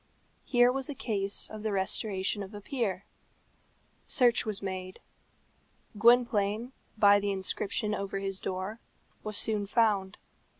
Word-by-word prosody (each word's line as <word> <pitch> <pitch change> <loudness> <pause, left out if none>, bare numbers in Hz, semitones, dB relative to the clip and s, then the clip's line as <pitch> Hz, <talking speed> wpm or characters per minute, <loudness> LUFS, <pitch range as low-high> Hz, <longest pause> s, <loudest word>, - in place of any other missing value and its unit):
Here 245 0 +4
was 270 +1 -3
a 290 - -4
case 200 -5 -1
of 215 -1 -8
the 215 0 -2
restoration 195 +1 0
of 200 +2 -8
a - - -6
peer. 200 -6 -2 1.0
Search 240 -4 +3
was 210 -2 -2
made. 185 -1 -5 1.0
Gwynplaine, 230 0 +3 0.3
by 205 -1 +6
the 205 0 -2
inscription 195 +2 -2
over 195 -1 -3
his 195 -1 -3
door, 190 +4 -4 0.4
was 215 -1 -4
soon 210 -2 0
found. 205 -3 +1
205 Hz, 130 wpm, -30 LUFS, 195-225 Hz, 1.0 s, by